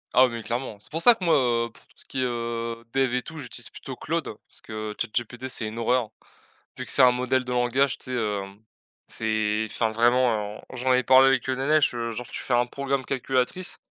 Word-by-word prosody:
Ah, 130 0 +7
mais 115 -2 -6
clairement, 115 0 -3
c'est 100 - -8
pour 165 - -2
ça 240 +6 +8
que 195 - -9
moi, 170 - +4
heu, 120 -3 +2
pour 110 - -20
tout - - -23
ce - - -13
qui - - -5
est, - - +2
heu, 115 -1 -3
dev 135 -2 +2
et 125 - 0
tout, 160 -1 -9
j'utilise 125 -5 -6
plutôt - - -8
Claude - - -2 0.2
parce - - -22
que 110 -1 -6
ChatGPT, 120 +3 -3
c'est 125 - -1
une 110 +2 -6
horreur, 115 -1 +1 0.7
vu 130 - -5
que - - -5
c'est 140 - +4
un 125 -1 +7
modèle 125 +1 0
de 125 - -4
langage, 125 +2 +1
tu - - -11
sais, 130 - -6
heu, 105 -5 -1 0.7
c'est 110 -1 0
enfin, 110 +1 0
vraiment 115 -2 +2
j'en 130 0 +1
ai 125 - +3
parlé 130 +1 +7
avec 135 -2 +2
Nenesh, 140 +3 +3
genre, 115 0 -4
tu - - -7
fais 125 - -1
un 120 0 +4
programme 135 +1 -2
calculatrice, 130 +7 -1
125 Hz, 220 wpm, -25 LUFS, 115-130 Hz, 0.7 s, ça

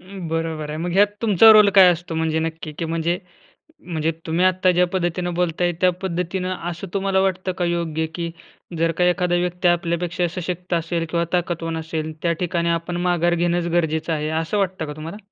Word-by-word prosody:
अं, 185 -2 -8
बरोबर 160 -2 -3
आहे, 155 - -4
मग 175 +1 -3
ह्यात 200 +2 +5 0.2
तुमचा 220 0 +7
रोल 210 -1 +7
काय 190 -2 +9
असतो 170 -1 -6
म्हणजे 160 0 0
नक्की 160 -1 -4
की 165 - -2
म्हणजे, 165 +2 -1 0.6
म्हणजे 165 - -2 0.2
तुम्ही 170 +3 +2
आत्ता 185 0 +3
ज्या 180 0 +3
पद्धतीने 175 0 -1
बोलताय 175 0 +1
त्या 185 - +5
पद्धतीनं 185 +1 -2
असं 175 +3 -6
तुम्हाला 195 -1 +1
वाटतं 185 -1 0
का - - +2
योग्य? 165 -2 -1
की 170 -1 -3 0.5
जर 165 0 +2
का 180 - +2
एखादा 180 0 +1
व्यक्ती 180 0 0
आपल्यापेक्षा 175 0 0
सशक्त 180 0 -4
असेल 165 0 -1
किंवा 170 0 0
ताकदवान 170 -2 -1
असेल 160 -1 -4
त्या 170 -1 +1
ठिकाणी 170 -1 0
आपण 170 +1 -2
माघार 175 0 +2
घेणंच 175 0 0
गरजेचं 160 0 0
आहे, 155 0 -2
असं 160 +5 -1
वाटतं 185 -4 -1
का 150 - -6
तुम्हाला? 160 +6 -7
175 Hz, 190 wpm, -22 LUFS, 165-180 Hz, 0.6 s, काय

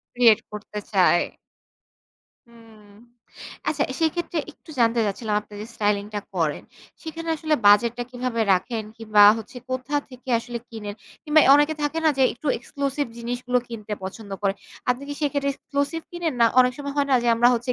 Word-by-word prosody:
Create 235 -3 +6
করতে 210 0 -7
চায়। 185 -3 +4 1.3
হুম, 225 -2 -18 0.8
আচ্ছা 295 -1 +1 0.2
সেক্ষেত্রে 330 +1 0
একটু 315 - -17
জানতে 230 0 +3
চাচ্ছিলাম 210 +1 -2
আপনি 210 0 -15
যে 215 - -6
স্টাইলিং 205 -1 +1
টা 205 - -1
করেন। 160 -5 0 0.4
সেখানে 330 0 -6
আসলে 310 0 0
বাজেট 210 +3 +6
টা 245 - -2
কিভাবে 250 -2 -3
রাখেন 220 +4 -1
কিংবা 215 -2 +4 0.2
হচ্ছে 225 +3 -10
কোথা 255 +3 -2
থেকে 255 +1 -14
আসলে 240 0 -6
কিনেন? 210 -3 -7 0.3
কিংবা 305 +1 +5
অনেকে 295 +2 +3
থাকে 295 +2 -1
না 315 - +6
যে - - +4
একটু 280 - -10
এক্সক্লুসিভ 280 +3 -3
জিনিসগুলো 245 +1 -1
কিনতে 215 -3 -5
পছন্দ 200 +2 -8
করে। 195 -1 +2 0.4
আপনি 250 +2 -1
কি 290 - -4
সেক্ষেত্রে 285 -1 0
এক্সক্লুসিভ 285 +4 -2
কিনেন? 345 -4 -2
না 230 - +7
অনেক 250 0 +3
সময় 280 -1 -5
হয় 285 -1 +1
না - - +5
যে - - +2
আমরা 240 +1 +5
হচ্ছে 245 +2 -1
245 Hz, 170 wpm, -24 LUFS, 215-285 Hz, 1.3 s, না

